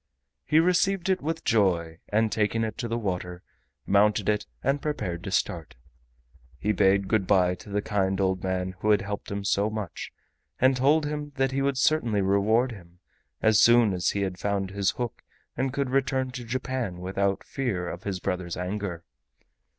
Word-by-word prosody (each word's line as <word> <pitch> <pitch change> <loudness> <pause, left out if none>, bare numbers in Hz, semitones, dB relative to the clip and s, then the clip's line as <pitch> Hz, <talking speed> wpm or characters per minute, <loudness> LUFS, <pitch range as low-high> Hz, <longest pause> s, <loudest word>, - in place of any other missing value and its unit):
He 155 - +4
received 180 +2 +2
it 190 -1 +2
with 160 +3 -3
joy, 85 -7 +1
and 110 +1 +2
taking 110 +1 +1
it 110 -1 -3
to 120 - -2
the 115 0 -2
water, 90 -4 -4 0.4
mounted 105 +1 +3
it, 105 -5 0 0.2
and 140 +2 +1
prepared 95 - -3
to - - -4
start. 85 -4 -2 0.8
He 105 - 0
bade 100 -1 +3
good 100 -4 +1
by 90 -2 +4
to - - -13
the 100 0 -1
kind 95 -2 0
old 95 -1 0
man 95 0 -1
who 105 - -1
had 105 -2 +4
helped 100 0 -5
him 100 0 -3
so 100 +1 +1
much, 105 -6 -5 0.5
and 130 +1 +4
told 145 +4 +3
him 145 0 -4
that 135 -1 +1
he 135 +1 -1
would 140 -1 0
certainly 130 -8 +2
reward 110 +6 +2
him 90 -5 -13 0.5
as 110 -1 +5
soon 120 -3 +6
as 90 -1 0
he 100 -1 0
found 95 +1 -2
his 100 -1 +1
hook 120 -3 -4 0.3
and 130 +1 -1
could 140 -1 -2
return 130 -1 0
to 125 -2 -7
Japan 125 -5 -3
without 95 +2 -1
fear 105 -10 -3
of 85 - -6
his 95 -2 -3
brother's 90 -2 -3
anger. 90 -2 -4
105 Hz, 180 wpm, -26 LUFS, 95-130 Hz, 0.8 s, soon